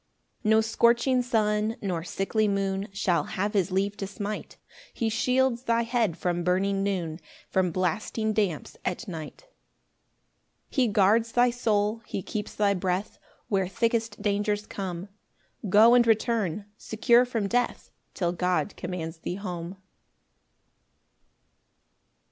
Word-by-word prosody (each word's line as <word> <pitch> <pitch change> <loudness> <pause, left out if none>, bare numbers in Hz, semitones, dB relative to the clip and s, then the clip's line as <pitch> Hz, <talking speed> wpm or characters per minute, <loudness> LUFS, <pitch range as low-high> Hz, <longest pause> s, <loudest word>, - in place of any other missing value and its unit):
5 215 - -1
Nor 220 0 +6
scorching 235 +3 +3
sun, 215 -2 +1
nor 180 -5 -2
sickly 210 +4 0
moon, 195 0 -1
Shall 195 -3 +1
have 205 +3 -2
his 195 -2 +1
leave 195 +2 0
to 195 - -4
smite; 205 +1 -6 0.4
He 230 - 0
shields 250 +2 +1
thy 230 0 +2
head 230 -7 0
from 175 -1 -1
burning 195 +2 +1
noon, 180 -5 -2 0.3
From 185 -1 +2
blasting 190 +5 -1
damps 200 -8 -1
at 185 +5 -3
night. 165 - -7
6 - - -28 1.2
He 260 -4 +2
guards 220 +3 +3
thy 245 0 +4
soul, 220 -2 0
he 190 - -4
keeps 210 +2 -5
thy 205 -1 +3
breath 185 +1 -2 0.3
Where 195 -5 +1
thickest 230 +4 -1
dangers 205 0 0
come; 185 -2 -5 0.6
Go 220 +5 +7
and 240 -1 +5
return, 220 -4 +1
secure 235 +2 +3
from 230 -5 -2
death, 245 +4 -1 0.2
Till 175 -2 0
God 180 +3 -1
commands 170 -2 -5
thee 175 - -4
home. 180 -2 -6
205 Hz, 130 wpm, -27 LUFS, 185-230 Hz, 1.2 s, Go